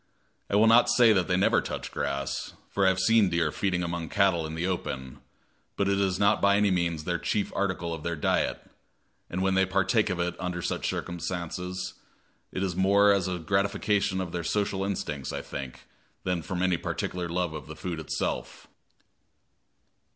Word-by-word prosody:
I -, -, 0 dB
will 105 Hz, +2 st, +6 dB
not 115 Hz, +2 st, +6 dB
say 120 Hz, -3 st, +6 dB
that 95 Hz, -5 st, +1 dB
they 90 Hz, -, +2 dB
never 95 Hz, -, +3 dB
touch -, -, -5 dB
grass, 70 Hz, 0 st, -3 dB, 0.2 s
for 100 Hz, -1 st, +2 dB
I -, -, +7 dB
have 95 Hz, -, +1 dB
seen 105 Hz, +1 st, +4 dB
deer 85 Hz, -3 st, +1 dB
feeding 90 Hz, -1 st, -1 dB
among 85 Hz, -2 st, -3 dB
cattle 95 Hz, -4 st, +2 dB
in 80 Hz, -, -6 dB
the 85 Hz, +2 st, -2 dB
open, 65 Hz, -8 st, -4 dB, 0.6 s
but 100 Hz, -, +1 dB
it 100 Hz, 0 st, +2 dB
is 95 Hz, -2 st, +1 dB
not 100 Hz, +2 st, +3 dB
by 100 Hz, 0 st, +5 dB
any 105 Hz, -1 st, +3 dB
means 85 Hz, -3 st, 0 dB
the 85 Hz, +1 st, -1 dB
chief 105 Hz, -2 st, -1 dB
article 95 Hz, -4 st, -1 dB
of 80 Hz, -, -6 dB
their 85 Hz, +1 st, -2 dB
diet, 75 Hz, -, 0 dB, 0.6 s
and 95 Hz, +2 st, -2 dB
when 95 Hz, 0 st, +2 dB
they 95 Hz, 0 st, +4 dB
partake 95 Hz, +3 st, +2 dB
of 90 Hz, -, -2 dB
it 85 Hz, 0 st, -1 dB
under 90 Hz, -2 st, -3 dB
such -, -, -2 dB
circumstances, 90 Hz, +1 st, -4 dB, 0.6 s
it 95 Hz, -, -2 dB
is 90 Hz, -3 st, -1 dB
more 100 Hz, +2 st, +5 dB
as 95 Hz, -2 st, +1 dB
a 90 Hz, -1 st, -2 dB
gratification 100 Hz, +2 st, 0 dB
of 90 Hz, -3 st, -3 dB
their 85 Hz, 0 st, -3 dB
social 100 Hz, +1 st, 0 dB
instincts, 75 Hz, -8 st, -3 dB
I -, -, -4 dB
think, 65 Hz, -3 st, -7 dB, 0.4 s
than 90 Hz, -2 st, -1 dB
from 90 Hz, +2 st, -3 dB
any 90 Hz, -2 st, +2 dB
particular 90 Hz, +1 st, -3 dB
love 90 Hz, -1 st, -1 dB
of 75 Hz, -3 st, -7 dB
the -, -, -8 dB
food 85 Hz, -3 st, -4 dB
itself. 80 Hz, -, -3 dB
90 Hz, 190 wpm, -28 LUFS, 85-100 Hz, 0.6 s, I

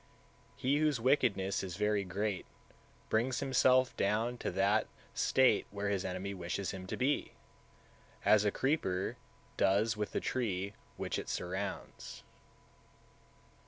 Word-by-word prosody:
162. -, -, -5 dB
He 140 Hz, +2 st, +4 dB
whose 150 Hz, -5 st, +2 dB
wickedness 115 Hz, -7 st, +2 dB
is 90 Hz, -3 st, -5 dB
very 105 Hz, -1 st, +1 dB
great 100 Hz, +1 st, -2 dB, 0.6 s
brings 120 Hz, +3 st, +1 dB
himself 130 Hz, -1 st, +3 dB
down 110 Hz, +5 st, +1 dB
to -, -, -2 dB
that 100 Hz, +4 st, +2 dB, 0.3 s
state 130 Hz, -1 st, +3 dB
where 100 Hz, 0 st, -3 dB
his 100 Hz, -2 st, 0 dB
enemy 95 Hz, +2 st, -3 dB
wishes 90 Hz, +1 st, -3 dB
him 95 Hz, -1 st, -7 dB
to -, -, -4 dB
be, 140 Hz, +3 st, 0 dB, 0.9 s
as 105 Hz, -1 st, +6 dB
a 105 Hz, -, +3 dB
creeper 100 Hz, -, 0 dB, 0.4 s
does 105 Hz, +3 st, +3 dB
with 105 Hz, -1 st, -3 dB
the -, -, 0 dB
tree 100 Hz, -6 st, -2 dB, 0.2 s
which -, -, -2 dB
it -, -, -6 dB
surrounds. 95 Hz, +3 st, -5 dB
105 Hz, 130 wpm, -33 LUFS, 95-125 Hz, 0.9 s, as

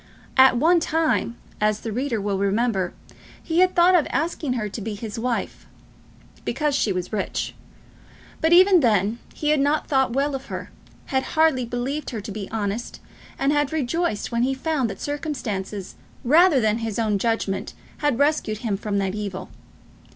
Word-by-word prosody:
At 260 Hz, -2 st, +6 dB
one 335 Hz, +7 st, +4 dB
time, 320 Hz, -7 st, 0 dB, 0.2 s
as 215 Hz, 0 st, +1 dB
the 225 Hz, -, -4 dB
reader 245 Hz, 0 st, -1 dB
will 200 Hz, -1 st, -1 dB
remember, 200 Hz, -2 st, 0 dB, 0.5 s
he 330 Hz, +1 st, 0 dB
had 370 Hz, 0 st, +4 dB
thought 355 Hz, +1 st, +6 dB
of 345 Hz, -5 st, +4 dB
asking 295 Hz, -1 st, -1 dB
her 225 Hz, -4 st, -2 dB
to 210 Hz, +2 st, -6 dB
be 215 Hz, +1 st, -4 dB
his 215 Hz, +1 st, -6 dB
wife; 240 Hz, 0 st, -3 dB, 0.8 s
because 300 Hz, -1 st, -1 dB
she 250 Hz, -7 st, +1 dB
was 180 Hz, +2 st, -3 dB
rich; 205 Hz, -3 st, -2 dB, 0.9 s
but 320 Hz, -, +2 dB
even 370 Hz, +1 st, +7 dB
then 220 Hz, -, +2 dB, 0.2 s
he 300 Hz, -, -1 dB
had 305 Hz, -1 st, +3 dB
not 290 Hz, +2 st, +1 dB
thought 265 Hz, -4 st, +2 dB
well 280 Hz, +2 st, 0 dB
of 270 Hz, 0 st, -5 dB
her, -, -, -6 dB, 0.4 s
had 265 Hz, -, +3 dB, 0.2 s
hardly 315 Hz, -6 st, +4 dB
believed 250 Hz, +5 st, -3 dB
her 225 Hz, -5 st, -5 dB
to 205 Hz, -, -7 dB
be 200 Hz, -1 st, -6 dB
honest, 215 Hz, +1 st, -3 dB, 0.4 s
and 275 Hz, -, +1 dB
had 290 Hz, -2 st, +1 dB
rejoiced 315 Hz, -5 st, -1 dB
when 235 Hz, 0 st, 0 dB
he 265 Hz, +2 st, +1 dB
found 270 Hz, -3 st, -1 dB
that 200 Hz, -, -7 dB
circumstances 215 Hz, -, -4 dB, 0.3 s
rather 310 Hz, +3 st, +5 dB
than 220 Hz, -1 st, +1 dB
his 225 Hz, -2 st, -3 dB
own 215 Hz, -3 st, +1 dB
judgment 225 Hz, -3 st, -1 dB, 0.2 s
had 290 Hz, -5 st, 0 dB
rescued 285 Hz, -6 st, +1 dB
him 205 Hz, -3 st, 0 dB
from 205 Hz, 0 st, -2 dB
that 195 Hz, -1 st, 0 dB
evil. 200 Hz, -3 st, -5 dB
245 Hz, 175 wpm, -23 LUFS, 210-295 Hz, 0.9 s, even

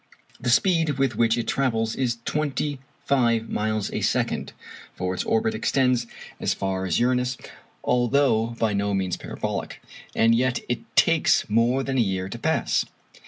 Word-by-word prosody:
The 120 Hz, -, -2 dB
speed 160 Hz, +1 st, +3 dB
with 135 Hz, -4 st, +1 dB
which 115 Hz, +1 st, +2 dB
it 120 Hz, -, -2 dB
travels 115 Hz, -5 st, 0 dB
is 120 Hz, -3 st, -1 dB
twenty 145 Hz, -1 st, -1 dB, 0.3 s
five 115 Hz, -5 st, +1 dB
miles 110 Hz, -1 st, -1 dB
a -, -, -3 dB
second, -, -, 0 dB, 0.4 s
(for 90 Hz, 0 st, -2 dB
its 90 Hz, -, -2 dB
orbit 110 Hz, 0 st, +1 dB
extends 125 Hz, +1 st, +1 dB, 0.3 s
as -, -, 0 dB
far 95 Hz, -1 st, -2 dB
as 85 Hz, -, +1 dB
Uranus, 125 Hz, +1 st, +1 dB, 0.5 s
although 120 Hz, -2 st, +2 dB
by 110 Hz, -3 st, +1 dB
no 100 Hz, 0 st, 0 dB
means 95 Hz, -2 st, -1 dB
parabolic), -, -, -5 dB, 0.4 s
and 115 Hz, +1 st, +4 dB
yet 125 Hz, 0 st, +1 dB
it 120 Hz, -1 st, -1 dB, 0.2 s
takes 165 Hz, -2 st, +4 dB
more 120 Hz, +4 st, +2 dB
than 135 Hz, -1 st, -1 dB
a -, -, +5 dB
year 95 Hz, -3 st, -1 dB
to -, -, -7 dB
pass. -, -, +1 dB
120 Hz, 160 wpm, -24 LUFS, 110-130 Hz, 0.5 s, a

